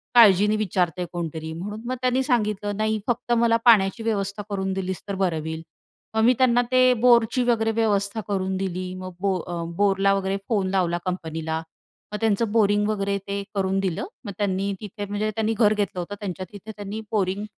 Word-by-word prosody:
काळजीने 210 Hz, -2 st, +7 dB
विचारतंय 180 Hz, -4 st, 0 dB
कोणतरी 160 Hz, -2 st, -4 dB
म्हणून 205 Hz, +6 st, -6 dB
मग 255 Hz, -, -1 dB
त्यांनी 255 Hz, +1 st, +2 dB
सांगितलं, 210 Hz, -5 st, 0 dB
नाही 215 Hz, 0 st, 0 dB
फक्त 240 Hz, 0 st, -1 dB
मला 230 Hz, 0 st, +4 dB
पाण्याची 225 Hz, -1 st, +5 dB
व्यवस्था 205 Hz, -2 st, -2 dB
करून 190 Hz, -1 st, -2 dB
दिलीस 190 Hz, -1 st, -3 dB
तर 200 Hz, -, -2 dB
बरं 180 Hz, -4 st, 0 dB
होईल. 160 Hz, +1 st, -5 dB, 0.5 s
मग 220 Hz, -, +3 dB
मी 250 Hz, +2 st, +6 dB
त्यांना 245 Hz, -2 st, +4 dB
ते 255 Hz, 0 st, +5 dB
बोरची 240 Hz, 0 st, +4 dB
वगैरे 225 Hz, -2 st, +2 dB
व्यवस्था 215 Hz, -1 st, 0 dB
करून 190 Hz, -1 st, -1 dB
दिली. 185 Hz, -1 st, -3 dB
मग 185 Hz, -1 st, -7 dB
ब -, -, -2 dB, 0.2 s
अ, 175 Hz, -, -4 dB
बो -, -, -4 dB
बोरला 195 Hz, -1 st, +3 dB
वगैरे 195 Hz, 0 st, 0 dB
फोन 200 Hz, -4 st, +1 dB
लावला 180 Hz, -3 st, +1 dB
कंपनीला. 160 Hz, -3 st, -3 dB, 0.6 s
मग -, -, -1 dB
त्यांचं 220 Hz, 0 st, +1 dB
बोरिंग 205 Hz, -2 st, +3 dB
वगैरे 200 Hz, -1 st, 0 dB
ते 200 Hz, 0 st, -2 dB
करून 195 Hz, 0 st, +1 dB
दिलं. 190 Hz, -4 st, -2 dB, 0.2 s
मग 205 Hz, -, -4 dB
त्यांनी 200 Hz, -1 st, 0 dB
तिथे 205 Hz, 0 st, -6 dB
म्हणजे 205 Hz, +2 st, -2 dB
त्यांनी 220 Hz, 0 st, 0 dB
घर 215 Hz, -2 st, +5 dB
घेतलं 200 Hz, -3 st, -2 dB
होतं. 190 Hz, +4 st, -5 dB
त्यांच्या 185 Hz, -2 st, -5 dB
तिथे 210 Hz, +2 st, -9 dB
त्यांनी 205 Hz, +1 st, -6 dB
बोरिंग 200 Hz, -1 st, 0 dB
200 Hz, 185 wpm, -24 LUFS, 190-220 Hz, 0.6 s, काळजीने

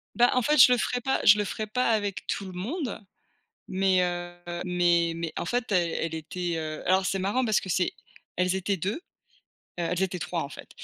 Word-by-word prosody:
Bah, 245 Hz, 0 st, +5 dB
en 255 Hz, -, +3 dB
fait 300 Hz, +6 st, +2 dB
je 250 Hz, -, +9 dB
le -, -, +2 dB
ferai 245 Hz, +1 st, -1 dB
pas 265 Hz, +2 st, 0 dB
je 205 Hz, +1 st, +8 dB
le 210 Hz, -, 0 dB
ferai 215 Hz, +3 st, -4 dB
pas 245 Hz, +3 st, 0 dB
avec 205 Hz, -3 st, -1 dB
tout 200 Hz, -, -2 dB
le 190 Hz, -, -7 dB
monde, 235 Hz, -, -4 dB, 0.7 s
mais 190 Hz, -1 st, +2 dB
heu, 175 Hz, 0 st, -3 dB, 0.3 s
mais 175 Hz, -2 st, +2 dB
mais 165 Hz, -1 st, -4 dB
en -, -, -3 dB
fait 240 Hz, +1 st, -1 dB
elle 175 Hz, -3 st, +2 dB
elle 165 Hz, 0 st, -2 dB
était, 170 Hz, +2 st, -3 dB
heu 155 Hz, -1 st, -5 dB
alors 185 Hz, +1 st, +3 dB
c'est 195 Hz, -, 0 dB
marrant 200 Hz, +7 st, 0 dB
parce 220 Hz, -3 st, +2 dB
que 190 Hz, -, -7 dB
c'est 180 Hz, 0 st, +1 dB, 0.4 s
elles 180 Hz, +1 st, +1 dB
étaient 190 Hz, +1 st, -1 dB
2, 190 Hz, +6 st, -2 dB
heu, -, -, -8 dB, 0.8 s
elles 175 Hz, +1 st, -1 dB
étaient 185 Hz, -1 st, -1 dB
3 170 Hz, 0 st, -3 dB
en 140 Hz, -, -5 dB
fait, -, -, -11 dB
185 Hz, 220 wpm, -27 LUFS, 175-215 Hz, 0.8 s, je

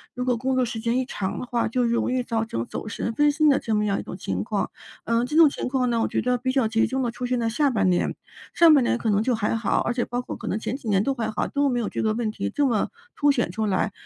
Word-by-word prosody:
如 250 Hz, -, -2 dB
果 250 Hz, -1 st, +1 dB
工 260 Hz, +2 st, -1 dB
作 255 Hz, -, +2 dB
时 235 Hz, -2 st, -3 dB
间 230 Hz, +2 st, 0 dB
一 -, -, 0 dB
长 195 Hz, -6 st, -4 dB
的 -, -, -5 dB
话， 240 Hz, -1 st, 0 dB
就 250 Hz, +2 st, 0 dB
容 235 Hz, 0 st, +1 dB
易 255 Hz, 0 st, +1 dB
造 225 Hz, -2 st, -1 dB
成 115 Hz, -, -3 dB
走 -, -, -6 dB
神、 220 Hz, -, -3 dB
分 295 Hz, +5 st, +3 dB
心 305 Hz, 0 st, +4 dB
的 275 Hz, -, +4 dB
这 220 Hz, -, -3 dB
么 210 Hz, -, +1 dB
样 200 Hz, -1 st, 0 dB
一 -, -, -5 dB
种 -, -, -7 dB
情 95 Hz, -, -3 dB
况。 205 Hz, -, -1 dB, 0.4 s
呃， 230 Hz, +1 st, +1 dB
这 300 Hz, -, -4 dB
种 320 Hz, -2 st, +8 dB
情 -, -, -4 dB
况 250 Hz, -1 st, 0 dB
呢， 235 Hz, -1 st, +1 dB
我 -, -, +1 dB
觉 -, -, -1 dB
得 250 Hz, 0 st, +1 dB
比 255 Hz, +2 st, -1 dB
较 260 Hz, -4 st, +2 dB
集 225 Hz, 0 st, +2 dB
中 265 Hz, +3 st, -2 dB
的 240 Hz, -, 0 dB
出 250 Hz, -, -5 dB
现 250 Hz, 0 st, 0 dB
在 230 Hz, -1 st, 0 dB
下 280 Hz, +5 st, +2 dB
半 200 Hz, -5 st, +2 dB
年， 180 Hz, -, +1 dB, 0.4 s
上 335 Hz, -1 st, +6 dB
半 275 Hz, -, +4 dB
年 240 Hz, -, +1 dB
可 225 Hz, -, -1 dB
能 205 Hz, 0 st, +2 dB
就 255 Hz, -, +1 dB
还 220 Hz, 0 st, -1 dB
好， 225 Hz, -2 st, 0 dB
而 235 Hz, -, -1 dB
且 240 Hz, -, 0 dB
包 245 Hz, +1 st, -3 dB
括 -, -, -7 dB
可 -, -, -8 dB
能 -, -, -1 dB
前 250 Hz, +4 st, -3 dB
几 250 Hz, -, -11 dB
年 200 Hz, -2 st, +2 dB
都 275 Hz, -, 0 dB
还 230 Hz, -3 st, -2 dB
好， -, -, -1 dB
都 285 Hz, 0 st, +1 dB
没 245 Hz, -3 st, 0 dB
有 225 Hz, -, -2 dB
这 -, -, -3 dB
个 215 Hz, -1 st, +1 dB
问 225 Hz, 0 st, -1 dB
题 215 Hz, -, -4 dB
这 290 Hz, -1 st, +1 dB
么 225 Hz, -5 st, 0 dB, 0.3 s
凸 290 Hz, -1 st, +3 dB
显 240 Hz, -10 st, 0 dB
出 220 Hz, +4 st, -2 dB
来。 200 Hz, +1 st, 0 dB
235 Hz, 340 characters per minute, -24 LUFS, 220-255 Hz, 0.4 s, 种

